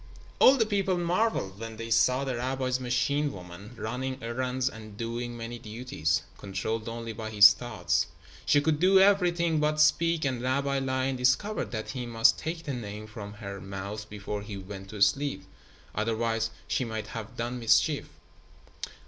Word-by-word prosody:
All 270 - +8
the 225 - +3
people 195 -3 0
marveled 175 - 0
when 115 -1 -7
they 115 0 -6
saw 130 +4 +4
the 130 -2 -2
rabbi's 130 +1 -1
machine 140 +4 0
woman 90 +5 -10
running 130 +4 -3
errands 125 +2 -2
and 110 -4 -7
doing 120 +1 -4
many 115 +1 -6
duties, 105 - -2 0.2
controlled 110 +4 -3
only 115 0 -5
by 110 0 -5
his 105 -1 +9
thoughts. 120 +1 -1 0.4
She 145 - +4
could 150 0 +1
do 190 +2 +6
everything 175 -5 +3
but 150 0 +1
speak, 165 +1 +3
and 130 -3 -1
Rabbi 140 +2 0
Lion 130 0 -1
discovered 130 +13 +1
that 110 -2 -4
he 125 -2 -5
must 115 -1 +4
take 165 +1 -4
the 140 - -3
Name 105 -3 -6
from 105 -1 -8
her 100 -2 -7
mouth 100 +2 -6
before 105 0 -5
he 105 -1 -7
went 95 0 -9
to 105 -1 +2
sleep. 140 +6 +1 0.5
Otherwise, 115 +1 0 0.2
she - - 0
might 110 -3 -4
have 110 -2 -7
done 120 +2 -3
mischief. 115 +5 +2
120 Hz, 165 wpm, -28 LUFS, 110-140 Hz, 0.5 s, his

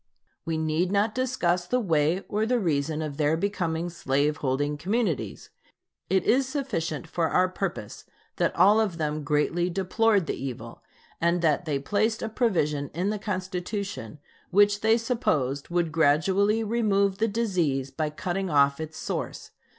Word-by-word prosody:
We 165 -1 -1
need 160 +3 0
not 205 +2 +2
discuss 180 -9 0
the 250 - +1
way 165 -3 +1
or 215 +1 0
the 250 +1 +2
reason 155 -4 0
of 145 -2 -5
their 155 +1 +2
becoming 170 -3 -1
slave 145 -1 0
holding 145 +2 -1
communities. 190 - -2 0.6
It 190 +1 +2
is 260 +2 +3
sufficient 175 - -3
for 165 0 -1
our 185 0 +3
purpose 185 - -5 0.3
that - - +1
all 210 +3 +5
of 200 -6 0
them 155 -1 -2
greatly 150 +4 +1
deplored 195 +2 +2
the - - -2
evil 120 -3 -7 0.4
and 170 +1 +2
that 160 +2 +2
they 150 -3 0
placed 215 +10 0
a 225 - -2
provision 150 - 0
in 185 +4 0
the 210 - -3
Constitution 185 - -4 0.3
which 205 +2 +4
they 220 +1 +4
supposed 155 - -1
would 170 -2 0
gradually 190 +8 +3
remove 200 -3 +1
the 225 - +2
disease 175 - 0
by 155 -1 -2
cutting 180 +5 -3
off 140 -2 +3
its 155 0 -6
source. - - -5
175 Hz, 155 wpm, -26 LUFS, 150-205 Hz, 0.6 s, all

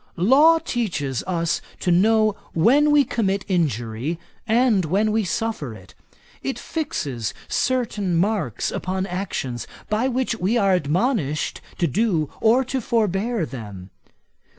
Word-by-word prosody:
Law 280 - +6
teaches 175 - -2
us 170 -2 0 0.2
to 180 - 0
know 215 +3 +4 0.2
when 270 - +4
we 295 -1 +5
commit 200 -6 -1
injury, 140 - -1 0.3
and 225 -3 +3
when 200 +7 +1
we 220 0 +1
suffer 190 - -3
it. 95 -2 -15 0.5
It 270 - -3
fixes 150 - -3
certain 225 -8 0
marks 180 - 0
upon 185 +1 -2
actions, 175 -10 -4 0.2
by 220 +4 +2
which 260 -1 0
we 205 +6 +1
are 195 -4 +3
admonished 165 - 0 0.2
to 175 - +1
do 170 - 0
or 235 +4 +4
to 260 +1 -2
forbear 215 -2 0
them. 100 -9 -9
195 Hz, 130 wpm, -22 LUFS, 160-230 Hz, 0.5 s, Law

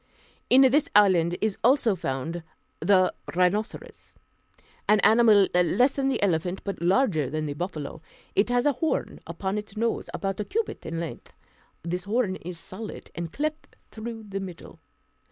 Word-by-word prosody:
In 265 +2 +7
this 290 +5 +4
island 175 -4 +4
is 215 -2 -1
also 245 -3 +4
found 165 +1 -3 0.4
the 185 +1 +3 0.2
rhinoceros, 185 +5 -1 0.7
an 210 0 +6
animal 215 -2 +6
less 235 +10 +3
than 275 -1 -1
the 270 - 0
elephant, 180 0 0
but 200 -3 -5
larger 175 - +2
than 155 +2 -2
the 145 - -3
buffalo. 155 -2 -5 0.3
It 200 +4 +3
has 245 +1 +2
a 290 - +5
horn 310 +5 -2
upon 195 +2 -3
its 210 0 -10
nose, 230 +1 -1
about 195 -1 -3
a - - 0
cubit 435 - -3
in 165 0 -3
length; 165 -2 -7 0.5
this 180 +2 -3
horn 210 -2 0
is 175 +1 -8
solid, 205 +6 -9
and 170 -1 -5
cleft 305 +2 -4 0.2
through 225 0 -7
the 195 -2 -5
middle. 185 -3 -9
200 Hz, 155 wpm, -26 LUFS, 175-235 Hz, 0.7 s, In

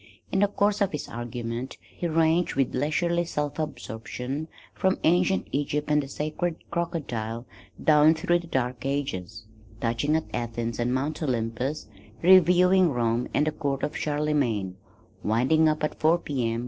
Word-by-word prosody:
In - - +1
the 205 - +5
course 205 0 +1
of 200 - +1
his 150 - -4
argument 120 +1 -5
he 175 - -5
ranged 165 +1 +2
with 135 -2 +1
leisurely 170 +5 +1
self 150 -3 -3
absorption, 135 0 -4 0.3
from 190 0 +1
ancient 180 +3 +2
Egypt 145 +2 -1
and 150 0 +4
the 135 - -7
sacred 155 +4 -2 0.2
Crocodile 125 -10 -3 0.4
down 155 +1 +6
through 175 +2 +1
the 170 - -10
dark 125 -4 -2
ages, 110 -7 -3 0.3
touching 120 +6 0
at 160 - 0
Athens 115 -1 -3
and 120 +1 +1
Mount 140 +5 -1
Olympus, 125 +1 -2 0.4
reviewing 180 0 +6
Rome 120 -2 0
and 150 - +2
the 155 - +1
court 140 -3 -3
of 150 - -2
Charlemagne, 145 -11 0 0.5
winding 130 +9 +3
up 155 0 -1
at 150 - -2
four 160 +2 +4
P. 130 -8 -2
M. 115 - -2
145 Hz, 155 wpm, -26 LUFS, 120-160 Hz, 0.5 s, down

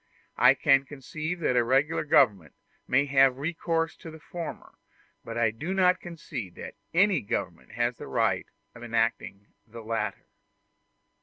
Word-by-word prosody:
I - - +7
can 135 0 +4
conceive 155 +5 -6
that 130 - +1
a 120 - +4
regular 135 +7 +1
government 100 - +3 0.3
may 140 +3 +3
have 135 -2 +4
recourse 165 +2 -2
to 165 - -10
the 160 - -10
former, 170 +1 -8 0.5
but 115 0 -6
I 115 -2 +2
do 155 - -4
not 185 -1 +3
concede 150 - -7
that - - -8 0.2
any 190 +2 +3
government 100 - -4
has 120 0 -1
the - - -9
right - - 0 0.3
of - - -13
enacting 115 -4 -1 0.2
the 115 +1 -10
latter. 110 -2 -3
135 Hz, 150 wpm, -27 LUFS, 115-165 Hz, 0.5 s, I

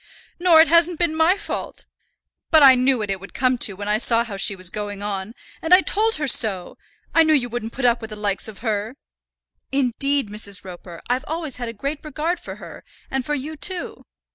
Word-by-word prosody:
"Nor 345 -3 +6
it 325 - +4
hasn't 335 0 +3
been 340 -2 +1
my 325 +4 +3
fault. 415 - -6 0.6
But 315 -3 +6
I 270 -1 +9
knew 255 +1 +2
what 210 -3 -3
it 195 - -3
would 195 - -13
come 255 -1 +1
to 205 - +1
when 205 +1 -7
I 210 +1 +1
saw 230 -1 +5
how 225 -4 -7
she 195 +1 +1
was 185 -1 -3
going 205 -1 -5
on; 205 +2 -5 0.3
and 335 +3 +6
I 375 - +4
told 445 +4 +2
her 300 - -2
so. 210 -8 0 0.4
I 330 - +5
knew 315 -1 +4
you 245 -4 0
wouldn't 230 -1 -5
put 260 - -3
up 240 0 +3
with 220 - -7
the 215 - -7
likes 205 -1 -1
of 220 +2 -11
her." 215 +2 -2 0.8
"Indeed, 275 -1 0
Mrs. 200 -2 -6
Roper, 175 -2 -11
I've 250 +1 -1
always 315 -4 -4
had 240 -2 -5
a - - -4
great 280 +7 -5
regard 310 +4 -3
for - - -9
her, - - -12 0.3
and 265 -1 -1
for 295 +3 -2
you 295 +3 -5
too." 355 +4 -6
250 Hz, 220 wpm, -21 LUFS, 210-310 Hz, 0.8 s, I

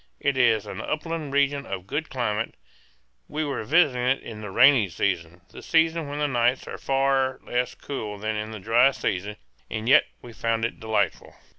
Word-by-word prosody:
It 140 -1 0
is 115 -5 +3
an - - -6
upland 155 -1 -3
region 140 0 +1
of 95 -2 -5
good 150 +9 -3
climate; 115 -4 -2 0.7
we 155 +1 -2
were 140 -5 -3
visiting 145 0 +3
it 130 +2 +1
in 110 -1 -8
the 105 - -6
rainy 120 0 +5
season, 85 -1 -2
the - - -11
season 165 -1 +2
when 145 +1 -5
the 150 0 +1
nights 125 -1 +1
are - - -7
far 135 -1 +1
less 125 0 -1
cool 105 -7 -6
than 110 +1 -3
in 105 0 -3
the 110 - -7
dry 115 +6 +4
season, 105 -5 -3 0.3
and 110 +1 -4
yet 130 - +6
we 120 - -12
found 115 0 0
it 115 - -5
delightful. 110 -1 -1
125 Hz, 185 wpm, -25 LUFS, 110-140 Hz, 0.7 s, yet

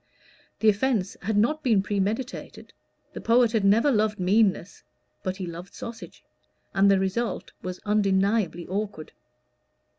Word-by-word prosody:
The 220 - +6
offence 210 -2 0
had 205 +2 -1
not 300 +9 +2
been 220 -8 +2
premeditated. 205 +6 -3 0.4
The - - -7
poet 235 0 +4
had 220 -3 +1
never 225 +8 +4
loved 215 -3 +1
meanness, 195 0 +1 0.4
but 185 0 -3
he 190 - -4
loved 175 +2 -9
sausage; 230 -1 -9 0.5
and 195 0 +4
the 195 - +5
result 195 +5 -2
was 185 0 -6
undeniably 200 -3 +1
awkward. 195 -4 -4
205 Hz, 130 wpm, -26 LUFS, 190-225 Hz, 0.5 s, The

